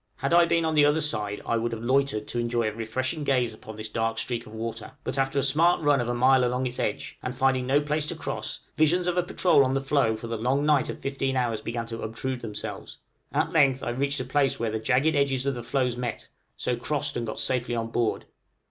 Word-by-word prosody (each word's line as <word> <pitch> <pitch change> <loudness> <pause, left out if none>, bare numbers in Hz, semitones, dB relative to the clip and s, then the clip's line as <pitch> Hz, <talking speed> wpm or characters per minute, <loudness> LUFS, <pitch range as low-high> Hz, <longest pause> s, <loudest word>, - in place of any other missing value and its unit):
Had 140 +4 -2
I 170 0 +7
been 165 0 +1
on 160 - 0
the 150 -1 +5
other 145 +2 +4
side 105 -10 -1
I 115 - +1
would 115 +1 -1
have 115 0 -5
loitered 130 -4 +1
to 120 - -2
enjoy 120 -1 0
a - - -1
refreshing 130 +7 -3
gaze 125 -5 +1
upon 110 0 -10
this 110 +1 -6
dark 115 0 -1
streak 115 0 -2
of 110 - -12
water; 115 0 -5
but 135 - -2
after 135 +1 0
a 140 - +3
smart 155 +6 +3
run 145 -3 +4
of 120 - -3
about 120 - 0
a - - -3
mile 130 +1 +5
along 125 +1 0
its 125 0 -3
edge, - - -3
and 125 0 -5
finding 130 -1 +2
no 140 +2 +4
place 150 +1 -1
to - - -2
cross, - - -4
visions 170 +4 +3
of 180 -1 0
a 180 - +3
patrol 175 -4 +3
on 130 0 0
the - - +2
floe 135 -5 +1
for 110 - -8
the 115 0 -3
long 135 +5 +1
night 150 -3 +3
of - - -4
fifteen 135 -1 -2
hours 115 -4 0
began 115 +1 -3
to 115 0 -6
obtrude 125 +3 -4
themselves! 105 -2 -6 0.3
At - - 0
length 135 -4 +3
I - - -2
reached 140 +3 -1
a 130 - -3
place 135 +1 +1
where 115 -1 -1
the 110 - -2
jagged 135 +7 +2
edges 135 -2 +1
of 140 - +1
the 120 - -5
floes 125 +1 0
met, 120 -2 -4 0.3
so 125 - -1
crossed 145 +3 -1
and 120 -1 -2
got 110 - -5
safely 125 -1 +1
on 115 -1 -2
board. 115 -2 0
130 Hz, 255 wpm, -26 LUFS, 115-140 Hz, 0.3 s, I